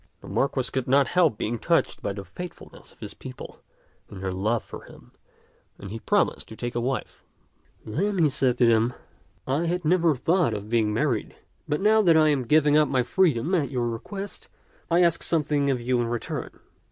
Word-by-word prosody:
The - - -12
Marquis 135 -2 -1
could 130 -2 -2
not 135 +1 +3
help 170 -11 +3
being 115 +1 -3
touched - - 0
by 100 - -3
the 100 -1 -8
faithfulness 175 - -10
of - - -23
his - - -7
people - - -10 0.5
in 95 - -9
their 95 0 -3
love 105 +5 -1
for - - -10
him, - - -16 0.7
and 100 0 -9
he 115 - -5
promised - - 0
to 110 - -10
take 120 +1 -5
a 120 - -1
wife. 130 +2 -4 0.6
Then 195 - -1
he 165 -3 +4
said 130 -3 +1
to 125 - +4
them, 115 +1 +3 0.3
" 95 - -36
I 140 +6 0
had 175 0 -2
never 165 -2 +3
thought 160 - +1
of 105 +1 -7
being 110 -3 +2
married, 120 0 -1 0.3
but 150 - 0
now 215 +2 +5
that 170 -5 +5
I 155 -1 +5
am 135 -4 0
giving 150 +1 +4
up 150 -1 +4
my 130 -2 +2
freedom 155 +2 +1
at 160 -6 +1
your 125 -3 -1
request, 195 - -7 0.4
I 175 +1 +4
ask 170 -1 +2
something 150 -3 +1
of 130 -2 0
you 120 +1 0
in 120 - -1
return. 120 0 -4
135 Hz, 200 wpm, -25 LUFS, 115-165 Hz, 0.7 s, now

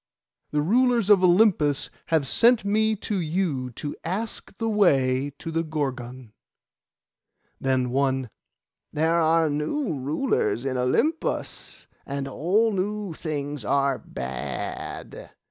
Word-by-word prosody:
The 150 0 0
rulers 235 +2 +3
of 195 -2 +6
Olympus 175 -6 +3 0.2
have 160 -4 +1
sent 230 - +4
me 220 +2 +2
to 210 -1 -3
you 160 -6 -1
to 145 +5 -5
ask 200 +4 -4
the 225 - -2
way 140 -10 +2
to 165 - -6
the 165 0 0
Gorgon.' 130 -6 -4 1.3
Then 130 -2 0
one, 130 -2 0 0.6
'There 160 +2 +1
are 165 0 +3
new 160 - -1
rulers 140 - -1
in 130 -1 -1
Olympus, 230 - -1 0.2
and 140 0 -4
all 190 - +1
new 200 -1 -2
things 145 -4 -4
are 140 +4 +1
bad. 65 +2 -5
155 Hz, 115 wpm, -25 LUFS, 135-200 Hz, 1.3 s, of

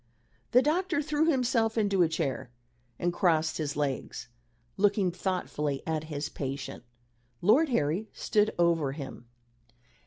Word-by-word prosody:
The 250 +2 +5
doctor 345 +2 +1
threw 300 +1 +1
himself 235 -5 +1
into 200 -3 +2
a 170 - +4
chair 150 -6 -2 0.5
and 175 0 0
crossed 160 -3 +2
his 145 -2 -2
legs, 140 -4 -3 0.5
looking 200 -2 +2
thoughtfully 175 -6 -2
at 160 -1 -2
his 145 -2 -4
patient. 135 -2 -5 0.6
Lord 250 - +4
Harry 175 - 0
stood 210 0 +1
over 165 -5 +2
him. 135 -4 -8
175 Hz, 125 wpm, -29 LUFS, 150-220 Hz, 0.6 s, The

